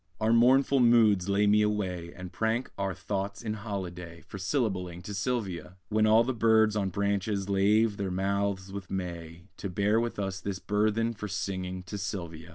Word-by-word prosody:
Our 110 +1 +2
mournful 130 +3 +5
moods 110 -6 +4
lay 100 +1 +3
me 105 +1 +4
away, 95 -5 -1
And 90 -1 -9
prank 115 +3 -1
our 95 -2 -2
thoughts 100 +3 -4
in 110 -2 -2
holiday, 90 -5 -6
For 100 - -9
syllabling 95 -5 -2
to 105 - -6
Sylvia; 95 -5 -3
When 110 0 +3
all 110 +2 +6
the 130 +2 -1
birds 110 -2 +3
on 100 -2 0
branches 100 0 -1
lave 100 +2 +3
their 100 -1 -2
mouths 95 +1 -1
with 100 -2 -7
May, 85 -3 -5
To 100 - -5
bear 100 +4 +2
with 120 0 -2
us 95 -2 -3
this 100 0 -3
burthen 110 +4 0
For 105 -1 -6
singing 95 -1 -4
to 95 +3 -6
Sylvia! 85 -4 -5
100 Hz, 175 wpm, -29 LUFS, 95-110 Hz, -, all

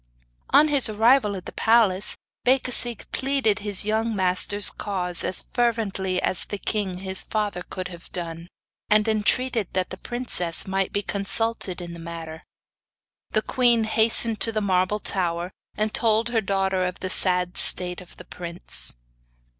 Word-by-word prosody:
On 300 +2 +5
his 280 -5 +5
arrival 220 0 +3
at 180 - -10
the - - -7
palace 210 -4 +2 0.3
Becasigue 250 -3 +2
pleaded 265 -6 0
his 205 -2 -2
young 220 +1 -1
master's 190 +2 +2
cause 180 -3 -3
as 185 - -2
fervently 210 -6 -1
as 185 - +2
the 205 - -5
king 200 -3 -2
his 190 0 0
father 210 -4 -3
could 185 0 -7
have 170 -1 -13
done, 170 -1 -6 0.4
and 215 +1 +3
entreated 220 0 +1
that 185 -1 -1
the 185 - -6
princess 225 -8 -2
might 195 0 -2
be 205 - -2
consulted 200 -1 -2
in 170 -1 -7
the 170 - -10
matter. 165 -1 -8 0.9
The - - +1
queen 240 -3 +2
hastened 220 0 +2
to 225 - +5
the 215 - -1
marble 185 0 0
tower, 175 -3 -1 0.3
and 215 0 -1
told 225 0 +2
her 230 -2 0
daughter 195 -2 -1
of 180 0 -4
the 185 - -3
sad 180 -2 +2
state 180 0 +4
of 180 - -14
the - - -12
prince. 170 - 0
200 Hz, 155 wpm, -23 LUFS, 180-225 Hz, 0.9 s, On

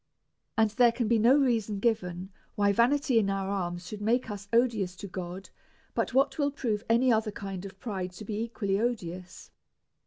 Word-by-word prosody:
And 220 -1 +3
there 240 +2 +5
can 235 -1 -2
be 230 0 +3
no 245 +6 +6
reason 230 -7 +1
given 190 -5 -1 0.2
why 205 -1 +3
vanity 250 +3 +3
in 200 -3 +1
our 195 0 -1
alms 175 -2 -3
should 205 +2 -7
make 230 +2 +1
us 205 -1 -7
odious 225 -6 +2
to 200 - -8
God, 185 +1 -7 0.4
but - - -1
what 270 +5 +2
will 285 -1 +2
prove 230 -7 -2
any 240 +2 +4
other 220 -1 +1
kind 195 -2 -6
of 195 0 -10
pride 190 -5 -4
to 210 +4 -9
be 210 +1 -3
equally 205 -4 -1
odious. 185 -6 -4
210 Hz, 185 wpm, -29 LUFS, 195-235 Hz, 0.4 s, no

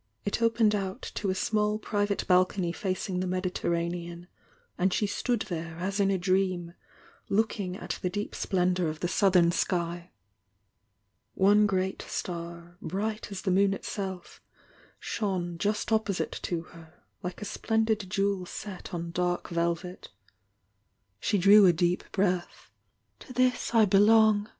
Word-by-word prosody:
It 205 - -1
opened 225 -2 +3
out 195 -2 -3
to 200 - -2
a 185 - 0
small 210 +2 +1
private 205 -1 -1
balcony 180 -1 +2
facmg 185 -1 -2
fee 185 - -2
Mediterranean, 175 -1 -2 0.5
and 185 +1 +1
she 210 - +1
stood 235 +3 -1
there 165 -4 -5
as 195 +4 -2
in 195 -1 +3
a 195 - +2
dream, 185 -2 0 0.6
looking 200 -3 0
at - - -5
the 180 - 0
deep 205 +3 -4
splendour 180 -2 0
of 155 0 -5
the 175 - 0
southern 180 -2 +4
sky. 175 -1 -1 1.3
One 205 +2 +5
great 190 -1 -1
star, 170 0 -6
bright 210 +5 -3
as 195 - -6
the 190 - +1
moon 195 +1 +3
itself, 190 -2 -6 0.6
shone 180 -5 -3
just 210 +3 -1
opposite 220 -4 0
to 170 -2 -2
her, 165 -2 -15 0.3
like 180 -2 -5
a - - -5
splendid 220 -2 0
jewel 195 -1 0
set 190 -2 -7
on 170 0 -4
dark 175 0 -1
velvet. 170 +2 -2 1.1
She 205 - +1
drew 200 +2 +7
a 175 - +6
deep 175 +2 0
breath. 185 -3 -1 0.5
"To 255 - -11
this 250 -1 +1
I 220 -1 +7
belong!" 210 +1 +5
190 Hz, 140 wpm, -28 LUFS, 175-205 Hz, 1.3 s, drew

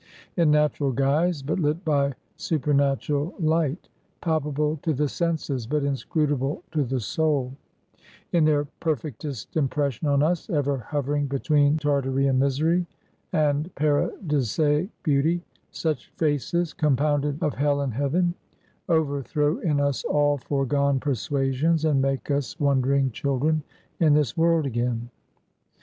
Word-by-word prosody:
In 170 -4 +3
natural 150 -2 +2
guise, 140 +4 +1
but 155 +6 -1
lit 155 +3 0
by 140 -3 +1 0.2
supernatural 145 +1 0
light; 160 -1 0 0.3
palpable 150 -1 0
to 160 - 0
the 150 +2 +1
senses, 145 -7 -2
but 150 +2 0
inscrutable 140 0 -1
to 155 -2 +1
the 130 0 -2
soul; 140 +1 0 0.8
in 170 -2 +3
their 145 -1 +2
perfectest 145 - -4
impression 145 -2 0
on 140 0 +3
us, 175 +6 0
ever 145 -5 0
hovering 145 +3 -2
between 145 +2 +2
Tartarean 135 -3 +1
misery 155 +6 +1 0.4
and 150 +1 +1
Paradisaic 150 - +1
beauty; 160 +3 +1 0.3
such 155 -6 -3
faces, 160 +2 0
compounded 145 0 +1
so 175 - -1
of 150 - 0
hell 145 +1 +1
and 135 -4 -2
heaven, 160 +8 +1 0.6
overthrow 150 -1 +1
in 150 -4 0
us 140 -3 0
all 145 0 +2
foregone 140 +1 0
persuasions, 140 +5 0
and 145 -4 +3
make 135 +1 -1
us 140 +3 -2
wondering 135 -1 +2
children 140 +6 0 0.4
in 155 -3 +5
this 150 -6 +1
world 165 -1 +3
again. 120 -1 -2
145 Hz, 125 wpm, -25 LUFS, 135-155 Hz, 0.8 s, in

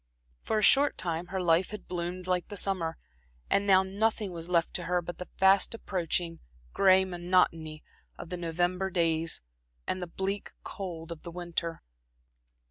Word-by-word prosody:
For 220 - -1
a 215 - +1
short 280 +7 +5
time 170 0 -2
her 190 - -3
life 175 0 +3
had 210 -1 -8
bloomed 180 +1 -4
like 180 -1 0
the 205 - -6
summer; 175 -5 -1 0.5
and 200 0 +3
now 190 -1 +6
nothing 205 +1 0
was 170 0 -5
left 170 -2 +2
to 175 - -3
her 180 +1 +1
but 175 -1 -7
the 180 - -6
fast 195 +4 +5
approaching 175 -5 -2 0.3
gray 190 -1 +5
monotony 175 -3 0 0.3
of - - -8
the 180 - -3
November 175 +3 0
days, 165 - +1 0.4
and 185 - -2
the 180 - -3
bleak 190 +3 -4
cold 170 -4 -6
of 165 - -7
the 170 - -8
winter. 170 -1 -4
180 Hz, 165 wpm, -29 LUFS, 170-190 Hz, 0.5 s, now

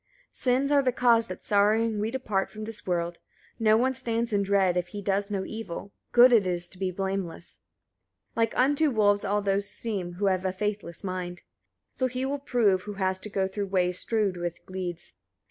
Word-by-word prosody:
Sins 260 +3 +1
are 285 -1 +5
the 260 -2 +2
cause 235 -2 +3
that 185 - -8
sorrowing 215 +2 +2
we 215 +2 0
depart 220 -6 -1
from 215 0 -8
this 220 -2 -7
world: 170 -1 -1 0.4
no 220 -1 +5
one 260 +3 +2
stands 230 -2 -2
in 200 - +3
dread, 195 -2 +2
if 180 -1 0
he 205 +3 -7
does 200 +1 0
no 195 -2 -2
evil: 200 -3 -6 0.2
good 245 +1 +7
it 210 -5 +5
is 175 -1 -2
to 185 - -11
be 190 -1 0
blameless. 190 -2 -4 0.7
31. 230 - -1
Like 225 - -2
unto 290 +4 +3
wolves 205 -4 +3
all 205 +1 0
those 200 0 0
seem 200 -6 -4
who 195 +4 -2
have 185 -1 +2
a 190 - 0
faithless 205 -3 -4
mind: 180 -2 -4 0.5
so 260 - 0
he 255 +1 -3
will 280 +1 -2
prove 230 -9 +2
who 205 +2 -7
has 190 -1 -1
to 210 - -7
go 195 -1 0
through 200 +1 -3
ways 180 -1 +1
strewed 210 -5 0
with 175 -1 -5
gleeds. 180 -2 -5
32. - - -36
200 Hz, 205 wpm, -27 LUFS, 185-230 Hz, 0.7 s, good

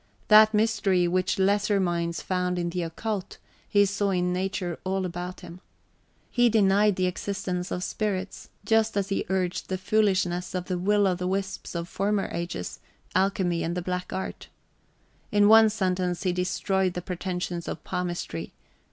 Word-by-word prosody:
That 215 0 +8
mystery 210 -5 +2
which 185 +3 0
lesser 200 +1 +2
minds 170 -2 -1
found 180 -1 -1
in 175 -1 -1
the 180 0 -2
occult, 190 +4 -4 0.3
he 205 -1 +5
saw 200 +1 0
in 180 -1 +1
nature 180 -2 -2
all 190 0 -1
about 180 +1 -5
him. 175 +2 -11 0.7
He 240 -1 +4
denied 205 -1 +4
the 185 - +1
existence 180 -1 -3
of 180 - -3
spirits, 195 -2 -3 0.2
just 225 0 +2
as 200 0 0
he 195 - -1
urged 185 -2 -1
the 190 - -1
foolishness 185 -3 +1
of 180 -1 -2
the 180 -1 -2
will 205 +2 +3
o' 190 - +3
the 180 0 -3
wisps 195 -1 -3
of 170 0 -3
former 200 +2 -1
ages, 170 - -4 0.3
alchemy 190 -3 +1
and 170 +2 -2
the 180 - -2
black 180 0 -3
art. 190 - -5 0.8
In 205 0 +5
one 220 0 +8
sentence 185 -4 -1
he 180 -2 +1
destroyed 185 0 0
the 180 - -4
pretensions 180 -1 -4
of 160 - -5
palmistry. 175 - -4
185 Hz, 160 wpm, -26 LUFS, 180-200 Hz, 0.8 s, That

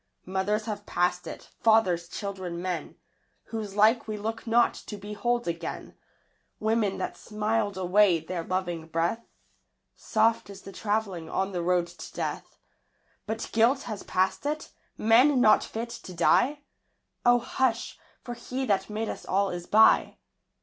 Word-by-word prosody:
Mothers 195 +3 -1
have 210 -2 -5
passed 180 0 0
it: - - -9
fathers, 190 -7 +3
children; 190 -4 -5
men 180 -1 -4 0.5
Whose 215 -3 -5
like 220 +3 +4
we 215 -1 -3
look 220 +3 -5
not 235 +1 +4
to 210 - -8
behold 210 +4 -2
again; 170 -1 -5 0.6
Women 220 -2 +1
that - - -3
smiled 210 -1 -1
away 185 -1 +4
their 165 +2 -5
loving 175 -3 -3
breath; 170 +8 -1 0.7
Soft 225 -1 +1
is 200 -1 -11
the 195 - -9
travelling 200 -6 -2
on 195 +3 -1
the 180 -2 -2
road 175 0 +2
to - - -11
death! - - -4 0.7
But 220 +1 -3
guilt 235 +5 +3
has 215 -4 -5
passed 190 +9 0
it? 305 +1 -3 0.3
men 250 +5 +5
not 215 -3 +5
fit 230 +1 -5
to 190 -6 -9
die? 280 - +3 0.6
O, 245 0 +6
hush 240 -1 -1 0.2
for 240 - -5
He 250 +3 -4
that 200 -4 0
made 215 +1 -3
us - - -5
all 195 +1 +1
is 175 0 -6
by! 220 +1 +5
210 Hz, 150 wpm, -27 LUFS, 185-225 Hz, 0.7 s, O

